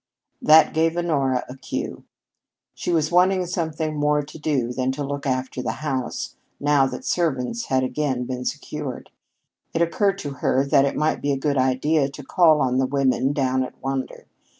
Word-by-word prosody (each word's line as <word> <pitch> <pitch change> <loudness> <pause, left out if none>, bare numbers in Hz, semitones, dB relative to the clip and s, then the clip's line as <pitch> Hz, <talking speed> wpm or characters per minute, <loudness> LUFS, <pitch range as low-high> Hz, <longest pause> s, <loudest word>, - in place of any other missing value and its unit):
That 155 +1 +6
gave 165 +1 +1
Honora 140 -7 0
a 125 - -9
cue. 135 - -5 0.7
She - - -3
was 160 -2 +1
wanting 185 +1 +3
something 160 -3 -2
more 150 0 +1
to 150 +2 -11
do 135 -6 0
than 130 +1 0
to 145 - -4
look 140 0 -4
after 130 -1 -2
the - - -2
house, 130 -4 -3 0.3
now 145 -2 +3
that 130 -1 -7
servants 170 - -1
had 130 -1 +1
again 130 -1 -1
been 125 0 -4
secured. 150 -2 -5 0.6
It 165 - +3
occurred 195 +3 +1
to 145 -7 -5
her 135 +2 +2
that 140 -1 +4
it 140 - -1
might 155 +1 0
be 145 - 0
a 135 - 0
good 140 0 0
idea 135 +3 +2
to 140 +1 -10
call 155 +1 +4
on 130 -1 +1
the 130 - +2
women 135 0 +1
down 130 -2 +1
at 130 - -5
Wander. 135 0 -4
140 Hz, 180 wpm, -23 LUFS, 130-155 Hz, 0.7 s, That